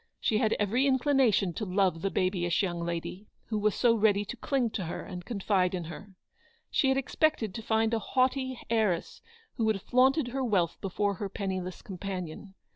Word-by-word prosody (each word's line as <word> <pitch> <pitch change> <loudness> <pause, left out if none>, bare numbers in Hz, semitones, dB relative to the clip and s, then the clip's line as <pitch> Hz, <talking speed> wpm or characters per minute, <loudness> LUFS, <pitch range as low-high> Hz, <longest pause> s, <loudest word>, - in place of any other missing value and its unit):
She 215 - +1
had 220 - +2
every 230 +7 +1
inclination 260 -8 +3
to 215 - -4
love 185 -4 +1
the 195 - 0
babyish 185 -1 0
young 175 -3 -2
lady, 170 +4 -4 0.2
"who 215 -2 0
was 210 -1 +1
so 240 -2 +4
ready 205 -2 +3
to 230 - -6
cling 250 -1 0
to 190 - -3
her 165 - -5
and 180 -2 -7
confide 190 -3 0
in 175 - -3
her. 190 +4 -10 0.6
She 275 - +2
had 265 - +2
expected 270 - 0
to 225 - -5
find 220 +1 +1
a 225 - +2
haughty 260 +3 0
heiress 215 -7 0 0.4
who 225 - +1
would 220 0 +3
have 195 - -7
flaunted 260 +2 +3
her 265 +2 -2
wealth 190 -9 0
before 200 +1 0
her 200 +1 -4
penniless 185 -3 -4
companion. 190 0 -6
205 Hz, 190 wpm, -29 LUFS, 185-240 Hz, 0.6 s, so